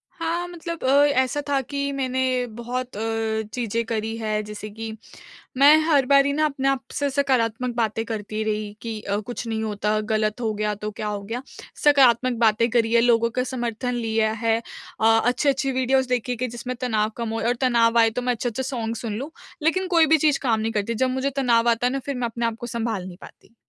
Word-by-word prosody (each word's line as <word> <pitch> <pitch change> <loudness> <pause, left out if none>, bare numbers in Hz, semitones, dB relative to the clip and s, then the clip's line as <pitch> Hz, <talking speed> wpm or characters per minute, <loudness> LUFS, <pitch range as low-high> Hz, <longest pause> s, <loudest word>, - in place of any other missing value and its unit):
हाँ, 340 +1 -2
मतलब 335 -2 -7
अ, 280 +2 +5 0.2
ऐसा 260 +3 -1
था 275 -1 +2
कि 280 +1 -3
मैंने 260 -1 -1 0.4
बहुत 245 -1 -4
अ, 225 0 -1
चीज़ें 230 -1 -1
करी 225 0 -2
हैं 215 -1 -1
जैसे 210 0 -7
कि 220 +1 -6 0.7
मैं 285 +3 +8
हर 285 -5 +4
बारी 280 +1 +4
ना 310 +1 +2
अपने 275 -2 -1
आप 270 -1 -1
से 285 -1 0
सकारात्मक 250 -3 0
बातें 225 -1 0
करती 215 -1 -4
रही 210 -1 -2
कि 225 -2 -5
अ, 200 -1 -2
कुछ 240 +2 -6
नहीं 220 -1 -2
होता, 210 0 -1
गलत 215 +1 -1
हो 220 -2 0
गया 210 0 -1
तो 210 +1 -5
क्या 215 0 -5
हो 205 -1 -3
गया? 230 +5 -4 0.4
सकारात्मक 255 -4 +4
बातें 230 +1 +3
करी 230 -1 +1
है, 235 - +5
लोगों 230 -1 +3
का 250 +1 -1
समर्थन 245 -1 -3
लिया 220 -2 0
है। 225 0 +3 0.4
अ, 220 - +3 0.2
अच्छी-अच्छी 270 +2 +1
वीडियोज़ 260 0 +1
देखे 250 0 -1
कि 255 +2 -2
जिसमें 240 +2 -5
तनाव 220 -3 +1
कम 230 -1 -3
हो 225 - -2
और 245 - +2
तनाव 235 -2 +3
आए 225 0 +5
तो - - -3
मैं 250 0 +1
अच्छे-अच्छे 240 +2 -3
सॉन्ग 230 -3 -3
सुन 220 -1 -4
लूँ। 285 +6 -6 0.3
लेकिन 370 +4 +1
कोई 335 -3 +5
भी 320 +1 +5
चीज़ 300 -1 +2
काम 225 -4 +2
नहीं 225 +1 -1
करती, 210 +2 -1
जब 255 +3 +1
मुझे 265 +2 -1
तनाव 235 -3 +3
आता 235 +2 +2
है 255 - -1
ना 275 - -1
फिर 280 - -3
मैं 250 -1 -2
अपने 235 +1 -3
आपको 230 +1 -3
सँभाल 225 -5 -3
नहीं 180 -1 -10
पाती। 230 - -16
235 Hz, 215 wpm, -23 LUFS, 220-265 Hz, 0.7 s, मैं